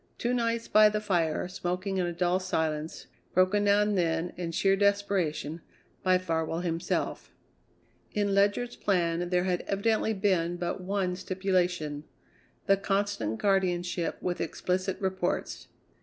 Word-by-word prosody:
Two 240 +1 -1
nights 230 -1 0
by 215 0 +6
the 210 0 -1
fire, 175 -6 0
smoking 185 +1 -3
in 180 -1 +1
a - - -2
dull 175 +1 +1
silence, 160 -4 -2 0.3
broken 185 +3 +3
now 205 0 +4
and 210 0 0
then, 170 -1 0
in 175 -2 -4
sheer 195 +3 +3
desperation, 195 -6 0 0.4
by 185 -1 +4
Farwell 165 -2 -2
himself. 170 -1 -2 0.8
In 205 -1 0
Ledyard's 205 +5 +2
plan 175 -2 0
there 180 0 +2
had 180 -1 0
evidently 220 +2 +1
been 185 -4 +1
but 175 +1 -3
one 185 -1 -1
stipulation: 180 -5 -1 0.6
the 195 -2 +4
constant 195 - -1
guardianship 180 -3 0
with 180 -1 -2
explicit 185 +3 -1
reports. 190 -2 -2
185 Hz, 135 wpm, -29 LUFS, 175-200 Hz, 0.8 s, by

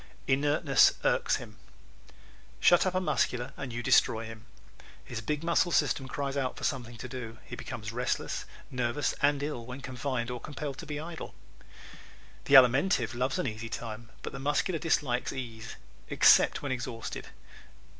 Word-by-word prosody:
Inertness 145 +1 +4
Irks - - +2
Him - - -8 0.5
¶ - - -21 0.5
Shut 175 +2 +5
up 185 - -1
a - - +3
Muscular 125 -8 0
and 135 -3 -6
you 120 +1 -4
destroy 115 0 +3
him. 110 0 -10 0.6
His 115 -2 -5
big 150 +7 -2
muscle 170 +1 +2
system 145 -4 +1
cries 140 0 -3
out 135 -2 -1
for - - -9
something 120 -4 -2
to 125 - -6
do. 120 -3 -7
He - - -7
becomes 105 -2 -6
restless, 125 +2 -2 0.3
nervous 125 +2 0
and 145 0 +3
ill 145 -5 -3
when 125 +3 -8
confined 125 -1 -3
or 120 -1 -5
compelled 145 -2 -6
to 165 - -8
be 150 -1 -4
idle. 165 +1 -7 1.1
The 145 - +5
Alimentive 130 - +5
loves 130 +2 -1
an - - -1
easy 115 +1 -4
time 115 0 -6
but - - -5
the - - -6
Muscular 150 +5 0
dislikes 140 -7 0
ease 115 -4 -7 0.3
except - - +5
when 140 - -2
exhausted. 120 -3 -5
130 Hz, 165 wpm, -30 LUFS, 120-145 Hz, 1.1 s, Shut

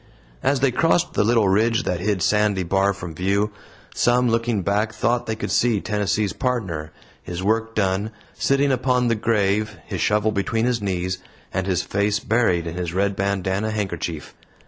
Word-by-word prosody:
As 135 -2 +1
they 135 -2 +3
crossed 165 +6 +2
the - - +2
little 115 -1 +3
ridge 115 +5 +2
that 90 - -1
hid 95 -1 0
Sandy 105 -2 +2
Bar 95 +3 +2
from 90 -4 -7
view, 100 +5 0 0.4
some, 125 0 +3
looking 115 -3 0
back, 105 +4 0
thought 120 +2 0
they 110 - -1
could 110 - -4
see 115 -4 +2
Tennessee's 105 -2 -1
Partner, 95 -12 -2 0.3
his 90 +1 -6
work 115 +2 0
done, 100 +1 0 0.2
sitting 140 0 +2
upon 125 -1 +1
the 115 - +2
grave, 105 -1 0
his - - -4
shovel 105 +1 +2
between 110 +3 0
his 120 -3 0
knees, 90 -2 -2 0.3
and 95 0 -1
his 95 -2 +1
face 100 +1 0
buried 105 -7 +1
in 85 - -4
his 90 -1 -3
red 100 +1 +1
bandanna 100 +1 -1
handkerchief. 90 -7 -4
105 Hz, 170 wpm, -22 LUFS, 95-115 Hz, 0.4 s, they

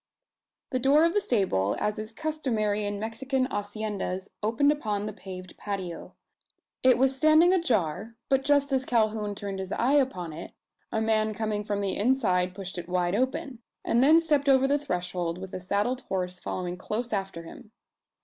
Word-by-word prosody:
The 255 - 0
door 285 +5 +5
of 335 - +2
the 415 - +2
stable, 180 - +1
as 210 +1 -1
is 215 +1 -5
customary 225 -8 -1
in 205 0 -3
Mexican 255 +5 -1
haciendas 205 -3 -3
opened 230 +7 +3
upon 210 -8 -2
the 215 - -4
paved 185 -3 -9
patio. 190 -4 -5 0.7
It 255 -1 +5
was 265 +1 +3
standing 310 +5 +5
ajar; 225 - 0
but 270 0 +2
just 285 0 +2
as 265 -1 +2
Calhoun 215 -4 0
turned 200 -1 -5
his 190 0 -5
eye 255 +4 +1
upon 255 - +1
it, 165 +3 -8 0.4
a 220 - 0
man 215 -1 +1
coming 215 -1 -2
from 205 -1 -2
the 195 -1 -1
inside 190 -6 +1
pushed 190 -2 -6
it 175 - -8
wide 180 0 +1
open; 255 +2 -1 0.3
and 235 +2 +3
then 310 +4 +7
stepped 295 -4 +1
over 270 0 +5
the 285 +1 +2
threshold, 180 -7 -3
with 190 0 -8
a - - -3
saddled 205 +8 -1
horse 180 -1 -3
following 180 0 -4
close 225 +5 -3
after 195 -4 -3
him. 210 +5 -12
215 Hz, 175 wpm, -27 LUFS, 190-265 Hz, 0.7 s, then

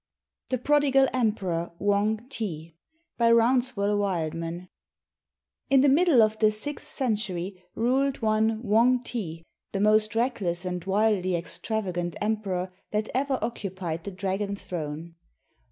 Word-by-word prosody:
THE 255 - 0
PRODIGAL 270 0 +3
EMPEROR 195 -9 -1
WANG 210 +4 0
TI 170 - -5 0.4
BY 230 0 +5
ROUNSEVELLE 230 -4 +3
WILDMAN 170 -2 -2 1.0
In 270 -1 +6
the 285 - +5
middle 295 -4 +5
of 215 0 0
the 215 -1 +4
sixth 290 +7 -3
century 200 - -2
ruled 265 +4 +1
one 220 0 +1
Wang 240 +3 +3
ti, 165 -10 -5 0.3
the 195 - -1
most 215 +1 +3
reckless 200 -7 0
and 180 -1 -3
wildly 195 -2 +2
extravagant 175 -1 -3
emperor 195 -4 -2 0.2
that 215 +1 -1
ever 270 +1 0
occupied 185 -7 -4
the - - -4
dragon 195 +2 -2
throne. 165 -3 -6
210 Hz, 120 wpm, -26 LUFS, 180-235 Hz, 1.0 s, In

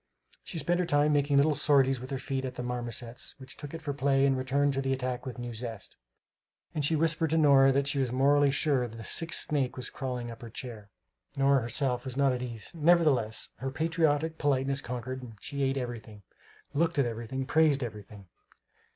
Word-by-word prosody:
She 175 - -5
spent 175 +3 0
her 180 - +1
time 145 -1 +3
making 145 -1 +2
little 150 +2 +4
sorties 135 -3 +3
with 130 +1 -8
her 135 - -2
feet 130 0 -3
at 130 -1 -5
the 125 - -4
marmosets, 120 -1 -5
which 130 -1 -10
took 145 -1 -8
it 165 -1 -8
for 145 - -2
play 135 -1 +2
and 135 -1 +3
returned 140 +2 +1
to 135 - -1
the 135 0 0
attack 130 0 -3
with 130 - -6
new 120 -1 -5
zest; 115 -3 -7 0.8
and 150 - -1
she 160 +3 +3
whispered 165 +1 +1
to 160 - +1
Nora 140 -3 +6
that 140 +1 +1
she 140 0 0
was 130 -3 0
morally 140 +2 +4
sure 135 -2 +1
the 115 0 -9
sixth 165 +8 +1
snake 140 -4 -1
was 130 - -5
crawling 125 -3 -4
up 115 - -11
her 120 - -8
chair. 110 -3 -8 0.5
Nora, 135 -1 +4
herself, 125 +1 -1
was 130 -1 -6
not 140 -2 +3
at 125 - -3
ease; 120 +1 -6
nevertheless, 155 -9 +2
her 135 - -3
patriotic 160 +1 0
politeness 135 -1 +1
conquered; 125 0 -6
she 140 0 -5
ate 135 0 +1
everything, 115 -5 -6 0.5
looked 165 +3 +1
at 140 - +3
everything, 120 +3 -4
praised 150 -2 +3
everything. 105 -3 -8
135 Hz, 200 wpm, -29 LUFS, 125-145 Hz, 0.8 s, Nora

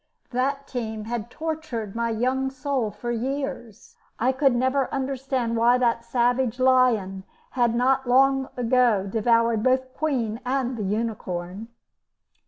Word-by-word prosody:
That 275 +3 -1
team 220 -4 -4
had 235 -1 -4
tortured 310 -10 -5
my 235 0 0
young 255 +4 0
soul 265 -3 -2
for 240 +3 -5
years. 255 -2 -5 0.2
I 250 +3 +2
could 265 -1 +2
never 260 +2 +1
understand 265 -3 -2
why 240 +2 +4
that 235 -2 +1
savage 245 +1 0
lion 245 -7 +3 0.3
had 240 -2 +1
not 265 +2 +2
long 270 +1 +3
ago 240 -4 +2
devoured 230 +2 +2
both 260 +1 +1
the - - -29
Queen 240 -8 -1
and 255 0 -1
the 225 - -5
unicorn. 200 -2 -3
245 Hz, 135 wpm, -24 LUFS, 230-265 Hz, 0.3 s, why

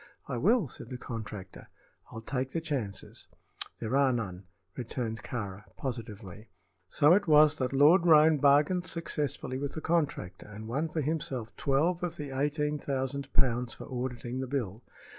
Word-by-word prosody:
"I - - -3
will," 205 - +3
said 120 - -9
the 125 - -5
contractor. 105 -6 -7 0.4
"I'll 110 - -7
take 130 +1 -3
the 165 - 0
chances." 135 - -4 0.5
"There 115 +3 -2
are 140 -1 +4
none," 100 -6 -3 0.3
returned 115 -2 -4
Kāra, 105 -4 -5
positively. 110 -5 -6 0.4
So 150 - +5
it 200 0 +3
was 150 -1 +7
that 130 -1 0
Lord 155 +6 +5
Roane 155 -1 +7
bargained 150 +6 +4
successfully 145 -5 -3
with 140 0 -3
the - - -3
contractor 155 - -1
and 105 +1 -9
won 145 +8 -1
for 155 - -2
himself 135 -6 -3
twelve 160 +6 +1
of 175 -2 -3
the 145 -4 -6
eighteen 150 +2 0
thousand 135 0 -3
pounds 125 -2 +1
for - - -9
auditing 125 -1 -4
the 130 - -3
bill. 120 -6 -3
135 Hz, 160 wpm, -30 LUFS, 115-150 Hz, 0.5 s, was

